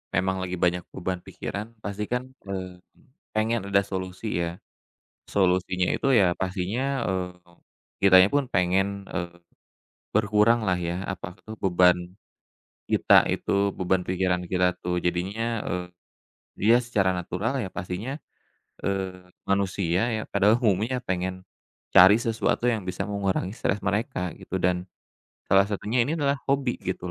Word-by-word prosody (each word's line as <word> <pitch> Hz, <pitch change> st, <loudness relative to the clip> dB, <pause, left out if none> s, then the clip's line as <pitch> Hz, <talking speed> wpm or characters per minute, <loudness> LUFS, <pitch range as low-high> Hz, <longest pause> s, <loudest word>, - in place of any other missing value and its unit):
Memang 95 Hz, +1 st, 0 dB
lagi 90 Hz, -1 st, -4 dB
banyak 90 Hz, 0 st, +1 dB
beban 90 Hz, -1 st, -4 dB
pikiran 105 Hz, +3 st, -6 dB
pasti 100 Hz, 0 st, -4 dB
kan, 125 Hz, +4 st, -4 dB
eee, 95 Hz, -2 st, -6 dB, 0.5 s
pengen 110 Hz, 0 st, 0 dB
ada 100 Hz, -, +5 dB
solusi 95 Hz, -1 st, -3 dB
ya, 85 Hz, +1 st, -5 dB, 0.7 s
solusinya 90 Hz, -1 st, +1 dB
itu 135 Hz, -, 0 dB
ya 95 Hz, -4 st, +4 dB
pastinya, 100 Hz, +10 st, -2 dB
eee, 95 Hz, 0 st, -1 dB, 0.7 s
kitanya 95 Hz, -1 st, +8 dB
pun 145 Hz, -1 st, +2 dB
pengen, 95 Hz, +2 st, +1 dB
eee, 85 Hz, -2 st, -5 dB, 0.8 s
berkurang 110 Hz, +1 st, +3 dB
lah 90 Hz, -, +3 dB
ya 85 Hz, 0 st, -3 dB
apa 95 Hz, -3 st, -4 dB
itu 110 Hz, -, -11 dB
beban 90 Hz, -1 st, +5 dB, 0.9 s
kita -, -, +5 dB
itu, 100 Hz, 0 st, 0 dB
beban 95 Hz, 0 st, +1 dB
pikiran 90 Hz, -1 st, 0 dB
kita 90 Hz, 0 st, +1 dB
tuh 90 Hz, 0 st, -1 dB
jadinya, 100 Hz, +6 st, -1 dB
eee, 90 Hz, 0 st, -2 dB, 0.7 s
dia 115 Hz, +4 st, +5 dB
secara 100 Hz, -6 st, +1 dB
natural 90 Hz, +6 st, -2 dB
ya 95 Hz, -, -4 dB
pastinya, 95 Hz, +11 st, -5 dB, 0.7 s
eee, 95 Hz, -2 st, -3 dB, 0.2 s
manusia 95 Hz, -2 st, 0 dB, 0.2 s
ya 110 Hz, -, -3 dB
padahal 105 Hz, +2 st, +4 dB
umumnya 115 Hz, +5 st, +1 dB
pengen, 95 Hz, -2 st, -3 dB, 0.5 s
cari 95 Hz, +3 st, +8 dB
sesuatu 115 Hz, 0 st, 0 dB
yang 110 Hz, -3 st, -2 dB
bisa 90 Hz, -, -2 dB
mengurangi 100 Hz, -2 st, -1 dB
stres 105 Hz, -, -1 dB
mereka 100 Hz, -, -1 dB
gitu 95 Hz, -, -4 dB
dan, 90 Hz, 0 st, +1 dB, 0.6 s
salah 95 Hz, 0 st, +6 dB
satunya 105 Hz, +3 st, -2 dB
ini 150 Hz, -, -1 dB
adalah 140 Hz, -1 st, +1 dB
hobi 135 Hz, -3 st, 0 dB
gitu 90 Hz, -1 st, -4 dB
95 Hz, 135 wpm, -26 LUFS, 90-105 Hz, 0.9 s, kitanya